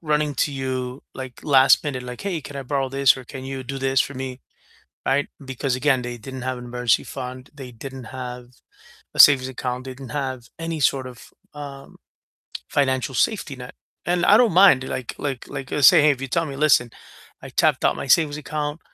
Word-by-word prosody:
running 150 -2 0
to 145 +2 0
you, 130 -1 -4
like, 130 -2 -9
last 135 -1 +5
minute, 135 -4 -3
like, 125 0 -8
"Hey, 185 -5 -2
can 140 +1 -9
I 140 - -4
borrow 135 0 -1
this?" 135 0 +4
or, 130 - -8
"Can 130 +1 -9
you 135 0 -5
do 135 +2 -6
this 135 0 +1
for 140 - -1
me?" 130 -1 -6 0.6
Right? 140 +2 +1 0.2
Because 130 0 -2
again, 130 -1 +2
they 120 0 -5
didn't 130 +2 -8
have 130 0 -3
an 125 - -9
emergency 125 -1 +1
fund, 130 -1 -7
they 135 -3 -9
didn't 130 +2 -9
have 125 0 -7 0.7
a - - -9
savings 130 -3 +8
account, 125 0 -4
they 130 -1 -7
didn't 130 -1 -10
have 130 -4 -4
any 165 -1 -3
sort 135 -2 +1
of, 125 -2 -14 0.2
um, 140 -2 -9 0.7
financial 130 -1 0
safety 155 - 0
net, 125 -1 -10 0.3
and 175 0 +1
I 205 - +7
don't 235 -3 +4
mind, 180 -7 +6
like 130 -2 -5
like 135 -4 -4
like 135 -2 -6
just 145 -3 +6
say, - - +6
hey, 150 - +5
if 135 -3 -1
you 135 - -3
tell 165 +6 0
me, 140 -2 -6
"Listen, 135 -5 +3 0.5
I - - -8
tapped - - +2
out - - +3
my - - -5
savings 150 -1 +4
account, 150 +1 -4
135 Hz, 205 wpm, -22 LUFS, 130-145 Hz, 0.7 s, savings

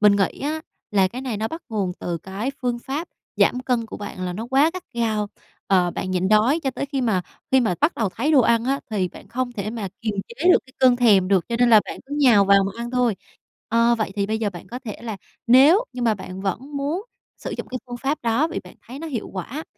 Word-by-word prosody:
Mình 210 -1 +6
nghĩ 195 -2 0
á 305 +3 -2 0.3
là 195 -2 +3
cái 245 +6 -7
này 255 -5 -3
nó 220 +2 -2
bắt 325 - -7
nguồn 200 -5 -1
từ 170 -1 -3
cái 195 - -4
phương 240 -1 0
pháp 285 +8 -4 0.3
giảm 250 - +3
cân 250 -3 0
của - - -8
bạn 205 -2 -7
là 180 - -3
nó 220 +6 -5
quá 280 +5 +4
gắt 370 - -5
gao, 220 -3 0 0.4
ờ, 180 -2 +3
bạn 185 - -4
nhịn 185 0 0
đói 225 +9 +4
cho 270 -4 -1
tới 280 - -4
khi 275 -1 -2
mà 215 -7 +1 0.3
khi 265 - +6
mà 220 -7 +1
bắt 300 - +3
đầu 220 - 0
thấy 265 - -1
đồ 280 - +7
ăn 230 -1 +3
á 275 +2 0
thì 195 -4 0
bạn 190 - -14
không 245 +2 -2
thể 210 -2 -4
mà 220 -4 -4
kiềm 215 -2 -2
chế 280 +10 -1
được - - +6
cái 260 - -19
cơn 255 -2 +5
thèm 205 -7 +4
được 190 -3 +3
cho 235 - -1
nên 245 -1 +4
là 220 - +8
bạn - - -7
cứ 285 - -5
nhào 240 -8 +6
vào 195 0 +5
mà 195 - -3
ăn 240 - -5
thôi. 245 -4 +1 0.5
Ơ, 230 +1 +4
vậy 210 -3 -1
thì 200 -1 +1
bây 220 +1 -1
giờ 215 -2 -1
bạn 175 -1 -10
có 245 - -5
thể 215 - -5
là 225 -3 -4 0.3
nếu 285 - +6
như 250 - -5
mà 230 -2 +3
bạn 190 -1 -8
vẫn 245 +10 -3
muốn 295 +7 -1 0.4
sử - - -6
dụng - - -6
cái 255 - -4
phương 245 -1 -6
pháp 270 +5 -1
đó 240 +7 +2
vì 335 - -4
bạn - - -13
thấy 260 +4 -8
nó 325 - -6
hiệu 245 -8 -4
quả 240 - -5
235 Hz, 265 wpm, -23 LUFS, 200-265 Hz, 0.5 s, là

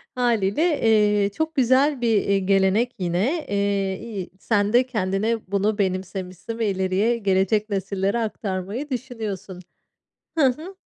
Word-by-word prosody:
Hâliyle, 245 - +1
eee, 210 -2 +3
çok 315 +9 -3
güzel 265 +1 +3
bir, 235 - +1 0.2
iii, 195 -1 +1
gelenek 195 +5 +2
yine, 205 - 0
eee, 200 -1 0
iyi 205 -6 -6
sen 205 -1 +1
de 250 +1 +5
kendine 215 -1 -1
bunu 205 +2 +1
benimsemişsin 185 +2 -3
ve 220 - +1
ileriye 190 +5 +1
gelecek 200 +1 +1
nesillere 195 +2 -1
aktarmayı 210 +4 -4
düşünüyorsun. 215 -8 -5 0.8
Hı 290 - +5
hı. 315 +9 -2
205 Hz, 125 wpm, -23 LUFS, 195-240 Hz, 0.8 s, de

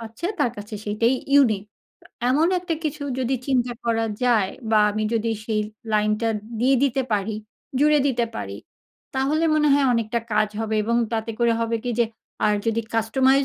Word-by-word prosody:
পাচ্ছে, 230 +8 -6
তার 245 - +3
কাছে 205 +1 -8
সেইটাই 230 +4 +2 0.2
ইউনিক। 235 -8 +5 0.4
তো - - -18 0.2
এমন 310 +6 +3
একটা 350 -2 -2
কিছু 300 0 -3 0.2
যদি 260 +1 0
চিন্তা 250 -3 +1
করা 225 -1 +1 0.2
যায় 220 -6 +3 0.2
বা 220 - +5
আমি 215 +1 -2
যদি 230 0 0
সেই 215 -1 0 0.3
লাইন 210 0 +2
টা 230 - +1 0.3
দিয়ে 265 +2 +4
দিতে 270 -1 +1
পারি, 210 +1 0 0.4
জুড়ে 300 +1 +5
দিতে 245 -4 +1
পারি, 100 0 -5 0.6
তাহলে 285 +5 +1
মনে 300 -1 +3
হয় 280 -1 +3
অনেকটা 230 0 0
কাজ 215 0 +3
হবে। 220 0 -1
এবং 235 +2 +1 0.2
তাতে 225 0 -1
করে 235 -1 +3
হবে 230 0 0
কি 245 - -1
যে 235 - +5 0.4
আর 210 0 +3
যদি 225 0 +1
কাস্টমাইজ 260 +5 +3
235 Hz, 180 wpm, -23 LUFS, 220-270 Hz, 0.6 s, ইউনিক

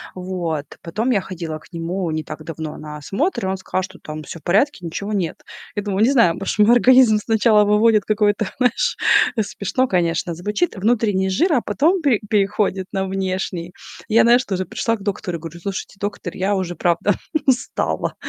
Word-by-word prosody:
Вот. 175 -5 -3 0.2
Потом 220 +9 -1
я 200 -5 +2
ходила 165 -4 -6
к - - -21
нему 170 +1 -3
не 155 0 -2
так 155 0 -8
давно 160 -1 -6
на 150 0 -8
осмотр, 200 - -2
и - - -1
он 190 - -1
сказал, 185 0 -2
что 190 - -9
там 155 0 -7
всё 165 - -8
в - - -31
порядке, 205 +3 +1
ничего 200 +6 -4
нет. 180 -5 -2 0.4
Я 205 - -2
думаю, 205 +1 0
не 255 - +4
знаю, 230 -11 +4
может 195 +4 -3
мой 210 +2 +5
организм 245 -3 +6
сначала 220 -1 +4
выводит 210 0 +3
какой-то, 210 -1 +1
знаешь- 365 - +1 0.4
смешно, 220 +5 -1
конечно, 170 -2 0
звучит- 210 - -1
внутренний 205 -2 +1
жир, 320 - +2
а 245 - +3
потом 325 - +1
пе 265 -8 +3
переходит 195 -2 0
на 190 0 0
внешний. 185 -2 -3 0.3
Я, 225 +1 +5
знаешь, 240 +2 +4
тоже 185 -1 -2
пришла 230 0 -1
к 200 - -11
доктору 185 -4 -3
и - - -13
говорю: 165 +1 -8
"Слушайте, 195 +1 -5
доктор, 200 -3 -4
я 195 +2 +1
уже 180 -2 -3
правда 175 +3 +1 0.3
устала. 260 -2 0
195 Hz, 185 wpm, -20 LUFS, 175-220 Hz, 0.4 s, организм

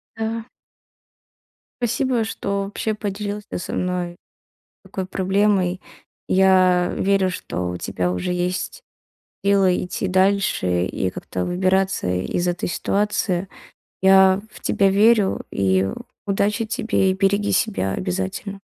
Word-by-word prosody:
Да. 225 +1 -4 1.3
Спасибо, 245 0 +1
что 200 -2 -2
вообще 205 +2 -2
поделился 205 0 -4
со - - -6
мной 180 -1 -2 0.7
такой 190 - -5
проблемой. 190 -1 +1 0.5
Я 185 -2 +4
верю, 195 -1 +2
что 90 - -4
у 90 - -4
тебя 90 0 -2
уже 90 - -2
есть 180 - -2 0.6
силы 195 -2 +3
идти 180 +1 -3
дальше 185 - +2
и 95 - -2
как-то 90 0 -5
выбираться 185 - +1
из 90 - -1
этой 175 0 -1
ситуации, 195 -1 0 0.6
я 190 0 +6
в - - -14
тебя 195 -1 +2
верю 210 0 +3
и 95 0 +1 0.4
удачи 205 +3 0
тебе. 210 -3 +1
И - - -3
береги 200 +1 +1
себя 195 - 0
обязательно. 95 - -4
190 Hz, 115 wpm, -22 LUFS, 180-205 Hz, 1.3 s, я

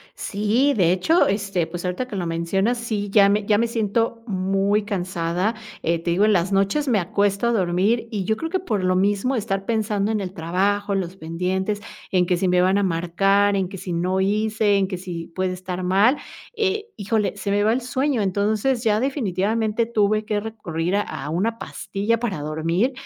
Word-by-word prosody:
Sí, 220 +8 +1
de 175 -4 +4
hecho, 320 - +3
este, 195 -4 0
pues. 175 +2 -7
ahorita 180 +8 -2
que 215 - -6
lo 180 -2 -2
mencionas, 180 +8 0
sí, 215 -3 -3
ya 200 -1 +6
me 205 0 +1
ya 210 - +4
me 230 - +2
siento 230 0 -1
muy 195 +1 +1
cansada. 185 0 -1 0.3
Eh, 170 +1 +1
te 170 +1 -3
digo, 185 +5 +3
en 215 - +4
las 185 +1 +1
noches 200 +10 +1
me 240 -5 +3
acuesto 200 +4 0
a - - +2
dormir, 200 +4 +1
y 205 -5 -2
yo 220 +3 0
creo 325 +7 -4
que 375 - +1
por 215 - -2
lo 185 0 +2
mismo 205 +7 +1
estar 195 -3 -2
pensando 215 -1 0
en 215 - 0
el 185 -2 -4
trabajo, 200 +5 0
los 190 -1 -3
pendientes 185 +5 -2 0.3
en 180 -2 +2
que 180 - +2
si 185 - 0
me 180 0 +3
van 185 +2 +3
a - - +1
marcar 195 +3 +2
en 190 -2 0
que 195 - -7
si 180 - -5
no 180 +3 0
hice, 210 +1 +2
en 195 -1 +2
que 185 -1 -5
si 175 -2 -6
puede 185 +2 -2
estar 185 0 -5
mal, 200 +9 +3 0.4
eh, 425 0 -1
híjole, 210 0 0
se 200 0 -3
me 205 +1 +2
va 220 - +4
el 250 - 0
sueño. 260 +1 0
Entonces, 215 +6 0
ya 215 -1 +3
definitivamente 220 - 0
tuve 215 -2 +1
que 210 -1 -1
recurrir 190 -5 -3
a 205 - +2 0.2
a 145 - -4
una 215 +8 -1
pastilla 200 +4 -2
para 210 -10 -2
dormir, 165 - 0
200 Hz, 205 wpm, -22 LUFS, 185-220 Hz, 0.4 s, ya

